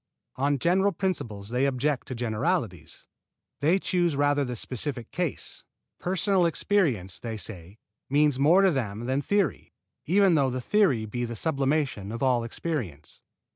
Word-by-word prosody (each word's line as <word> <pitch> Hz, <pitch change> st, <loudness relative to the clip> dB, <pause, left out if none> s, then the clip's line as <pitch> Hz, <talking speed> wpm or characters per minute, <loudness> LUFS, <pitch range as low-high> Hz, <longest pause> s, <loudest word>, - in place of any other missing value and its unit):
On 140 Hz, +2 st, +1 dB
general 190 Hz, +7 st, +2 dB
principles 140 Hz, -, -3 dB
they 125 Hz, +3 st, +1 dB
object 135 Hz, +1 st, -1 dB
to 130 Hz, -, -5 dB
generalities. 110 Hz, -7 st, -2 dB, 0.5 s
They 160 Hz, +6 st, +3 dB
choose 175 Hz, -4 st, 0 dB
rather 145 Hz, 0 st, +2 dB
the 125 Hz, -2 st, -4 dB
specific 125 Hz, +1 st, -4 dB
case. 175 Hz, -4 st, -3 dB, 0.4 s
Personal 185 Hz, 0 st, +2 dB
experience, 150 Hz, -, 0 dB
they 115 Hz, -2 st, -5 dB
say, 100 Hz, -2 st, -7 dB, 0.3 s
means 145 Hz, -1 st, +3 dB
more 170 Hz, +8 st, +5 dB
to 190 Hz, -, +5 dB
them 115 Hz, -5 st, -3 dB
than 130 Hz, +3 st, 0 dB
theory, 200 Hz, -1 st, -1 dB, 0.3 s
even 195 Hz, +2 st, +4 dB
though 140 Hz, -4 st, +3 dB
the 130 Hz, 0 st, -3 dB
theory 135 Hz, -, +2 dB
be 120 Hz, +3 st, -4 dB
the 120 Hz, -1 st, -4 dB
sublimation 135 Hz, -6 st, -1 dB
of 115 Hz, +3 st, -4 dB
all 125 Hz, -3 st, +3 dB
experience. 115 Hz, -, -5 dB
135 Hz, 145 wpm, -27 LUFS, 115-170 Hz, 0.5 s, more